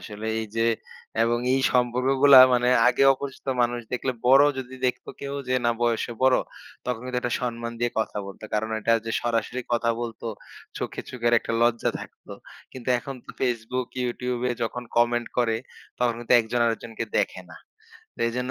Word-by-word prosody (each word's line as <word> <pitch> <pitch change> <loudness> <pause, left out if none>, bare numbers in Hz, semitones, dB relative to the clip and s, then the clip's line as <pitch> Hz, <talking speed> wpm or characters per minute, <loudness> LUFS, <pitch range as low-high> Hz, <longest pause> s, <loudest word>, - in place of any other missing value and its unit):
আসলে 105 0 -7
এইযে 115 +1 -1 0.6
এবং 120 +1 +2
এই 135 - +2
সম্পর্কগুলা 130 +3 +5
মানে 125 0 +3 0.2
আগে 125 - +2
অপরিচিত 135 0 -7 0.2
মানুষ 120 0 0
দেখলে 130 +1 -1
বড় 135 +3 +7
যদি 130 0 -6
দেখতো 125 0 -3
কেউ 140 0 -5
যে 130 - +1
না 120 - +4
বয়সে 120 0 0
বড়, 130 -1 +5 0.5
তখন 125 -2 -2
কিন্তু 125 -1 -2
একটা 120 -1 -1
সম্মান 115 -1 -3
দিয়ে 120 0 +1
কথা 110 - -3
বলতো। 100 +2 -10
কারণ 110 +1 0
এটা 115 - +2
যে 115 - -2
সরাসরি 120 +1 -1
কথা 115 0 +2
বলতো, 115 -1 -5 0.5
চোখে - - -4
চোখের 120 -1 0
একটা 115 - -5
লজ্জা 120 -1 +2
থাকত। - - -13 0.5
কিন্তু 130 -1 -8
এখন 135 +3 -7
তো - - -9
Facebook, 125 0 -1 0.2
YouTube-এ 125 0 -2
যখন 125 +2 -3
কমেন্ট 120 0 +2
করে, 115 -2 +2 0.4
তখন 120 -1 +1
কিন্তু 120 - -1
একজন 115 +2 -2
আরেকজনকে 115 0 -3
দেখে - - 0
না। - - -11 0.6
তো - - -25
এজন্য 125 +2 -3
120 Hz, 170 wpm, -25 LUFS, 115-125 Hz, 0.6 s, বড়